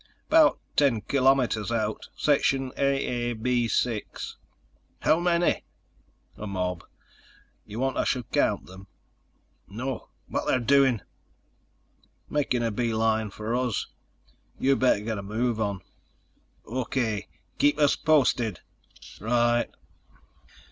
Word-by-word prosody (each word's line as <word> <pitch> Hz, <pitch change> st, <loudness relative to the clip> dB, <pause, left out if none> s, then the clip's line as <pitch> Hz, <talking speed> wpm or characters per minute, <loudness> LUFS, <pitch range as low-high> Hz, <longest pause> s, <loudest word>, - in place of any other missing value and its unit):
"About 315 Hz, -1 st, +5 dB, 0.2 s
ten 135 Hz, -7 st, +3 dB
kilometers 130 Hz, -4 st, +2 dB
out. 110 Hz, -2 st, -2 dB
Section 135 Hz, -3 st, +2 dB
AAB 120 Hz, -3 st, 0 dB
6." 115 Hz, -3 st, -2 dB, 0.7 s
"How 160 Hz, -, +3 dB
many?" 175 Hz, 0 st, +2 dB, 0.7 s
"A 105 Hz, -, -7 dB
mob. 90 Hz, -3 st, -2 dB, 0.8 s
You 105 Hz, +1 st, -7 dB
want 135 Hz, 0 st, 0 dB
I -, -, +2 dB
should 125 Hz, -3 st, -2 dB
count -, -, +1 dB
them?" 95 Hz, +1 st, -13 dB, 0.8 s
"No. 125 Hz, +5 st, -5 dB, 0.2 s
What're -, -, -3 dB
they 120 Hz, -, -4 dB
doing?" 135 Hz, -5 st, +4 dB, 1.3 s
"Making 135 Hz, -5 st, 0 dB
a 115 Hz, -, 0 dB
beeline 110 Hz, -1 st, 0 dB
for 110 Hz, +3 st, -3 dB
us. 125 Hz, -3 st, -1 dB, 0.7 s
You 135 Hz, +1 st, +3 dB
better 130 Hz, -6 st, +3 dB
get 110 Hz, -1 st, -3 dB
a -, -, -4 dB
move 110 Hz, +3 st, -1 dB
on." 100 Hz, -3 st, -2 dB, 0.8 s
"O.K. 115 Hz, -3 st, -2 dB, 0.3 s
Keep 145 Hz, 0 st, +4 dB
us 145 Hz, -2 st, +4 dB
posted." 125 Hz, -, +2 dB, 0.6 s
"Right." 120 Hz, +2 st, +2 dB
120 Hz, 105 wpm, -26 LUFS, 110-135 Hz, 1.3 s, About